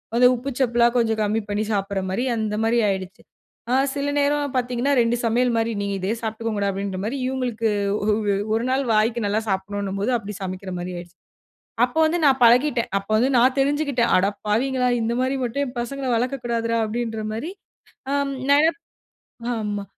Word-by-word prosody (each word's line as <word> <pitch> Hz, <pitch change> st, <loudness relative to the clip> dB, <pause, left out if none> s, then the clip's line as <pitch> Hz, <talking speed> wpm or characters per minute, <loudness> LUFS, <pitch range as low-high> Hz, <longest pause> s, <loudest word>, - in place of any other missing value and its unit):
அந்த 250 Hz, -, +5 dB
உப்பு 255 Hz, +3 st, -5 dB
சப்பலா 240 Hz, -2 st, +3 dB
கொஞ்சம் 225 Hz, -2 st, +1 dB
கம்மி 215 Hz, +2 st, +1 dB
பண்ணி 205 Hz, +1 st, 0 dB
சாப்பிடுற 195 Hz, -1 st, -1 dB
மாரி 200 Hz, +7 st, -1 dB
அந்த 215 Hz, -2 st, -2 dB
மாரி 230 Hz, +2 st, +2 dB
ஆயிடுச்சு. 190 Hz, -1 st, -3 dB, 0.5 s
ஆ, -, -, +2 dB, 0.2 s
சில 285 Hz, 0 st, -2 dB
நேரம் 285 Hz, -1 st, +1 dB
பாத்தீங்கன்னா 250 Hz, +2 st, 0 dB
2 235 Hz, +1 st, +1 dB
சமையல் 240 Hz, +2 st, +2 dB
மாரி, 225 Hz, 0 st, 0 dB
"நீங்க 200 Hz, 0 st, -2 dB
இதே 190 Hz, +4 st, -1 dB
சாப்டுக்கோங்கடா" 220 Hz, -2 st, -2 dB
அப்டின்ற 195 Hz, -1 st, -4 dB
மாரி, 240 Hz, +6 st, -2 dB
இவுங்களுக்கு 245 Hz, -4 st, -1 dB, 0.3 s
ஒவ் 210 Hz, 0 st, +1 dB, 0.2 s
ஒரு 225 Hz, -, +1 dB
நாள் 265 Hz, +1 st, +1 dB
வாய்க்கு 220 Hz, +2 st, +2 dB
நல்லா 205 Hz, +2 st, +1 dB
சாப்பிடணுன்னும்போது 200 Hz, +3 st, -2 dB
அப்டி 210 Hz, -1 st, -7 dB
சமைக்கிற 185 Hz, 0 st, -5 dB
மாரி 180 Hz, +1 st, -5 dB
ஆயிடுச்சு. 175 Hz, 0 st, -11 dB, 0.7 s
அப்போ 250 Hz, +6 st, -3 dB
வந்து 345 Hz, +2 st, 0 dB
நான் 265 Hz, -2 st, +3 dB
பழகிட்டேன். 245 Hz, +1 st, +4 dB
அப்போ 195 Hz, +2 st, -13 dB
வந்து 250 Hz, +5 st, +2 dB
நான் 255 Hz, +3 st, +4 dB
தெரிஞ்சுகிட்டேன், 280 Hz, -3 st, +1 dB
"அடப்பாவிங்களா! 220 Hz, +7 st, 0 dB
இந்த 230 Hz, +1 st, 0 dB
மாரி 260 Hz, +1 st, 0 dB
மட்டும் 280 Hz, +4 st, -1 dB
என் 245 Hz, -1 st, -9 dB
பசங்கள 270 Hz, +3 st, -4 dB
வளக்கக்கூடாதுரா" 235 Hz, -2 st, -1 dB
அப்டின்ற 225 Hz, 0 st, -3 dB
மாரி. 310 Hz, +11 st, -4 dB, 0.6 s
அம், 280 Hz, -1 st, 0 dB, 0.2 s
ந -, -, +8 dB, 1.0 s
ஆமா 205 Hz, -2 st, -3 dB
230 Hz, 160 wpm, -23 LUFS, 205-255 Hz, 1.0 s, ந